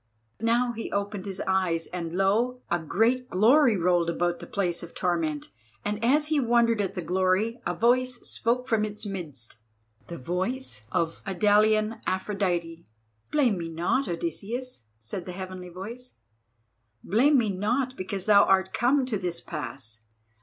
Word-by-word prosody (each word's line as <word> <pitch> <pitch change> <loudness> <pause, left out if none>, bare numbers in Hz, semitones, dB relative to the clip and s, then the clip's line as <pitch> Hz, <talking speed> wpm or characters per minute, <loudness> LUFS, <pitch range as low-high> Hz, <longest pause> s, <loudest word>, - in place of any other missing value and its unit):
Now 235 +2 +2
he 230 -1 -6
opened 200 -1 -3
his 195 -1 -4
eyes, 185 -3 +1
and 170 -2 -5
lo! 230 +6 +1
a 175 - +2
great 230 +10 +1
glory 235 +4 +5
rolled 175 -1 +2
about 175 0 0
the 170 - -9
place 180 -4 -1
of 170 - -10
torment, 160 - -1 0.3
and 210 +2 -2
as 295 +5 +3
he 310 -2 +2
wondered 235 -3 +3
at 195 - -3
the 180 - -3
glory, 185 +6 +1
a 175 - -1
voice 250 +5 +2
spoke 250 +3 -1
from 220 -3 +2
its 210 0 -4
midst—the 115 - -9
voice 180 - -3
of 165 -1 -1
the - - -6
Idalian 215 +3 +3
Aphrodite: 180 -4 -1 0.5
"Blame 250 -11 +2
me 165 -1 -4
not, 175 +11 0
Odysseus," 195 - -4
said 170 - -6
the 180 - -5
heavenly 185 -1 -7
voice; 225 +8 -8 0.9
"blame 265 - +4
me 220 -5 +2
not 245 +7 -1
because 190 -1 -4
thou 205 -2 +7
art 190 0 +2
come 260 +2 +2
to 225 -6 -2
this 175 -2 -2
pass. 130 -7 -7
195 Hz, 155 wpm, -27 LUFS, 175-235 Hz, 0.9 s, thou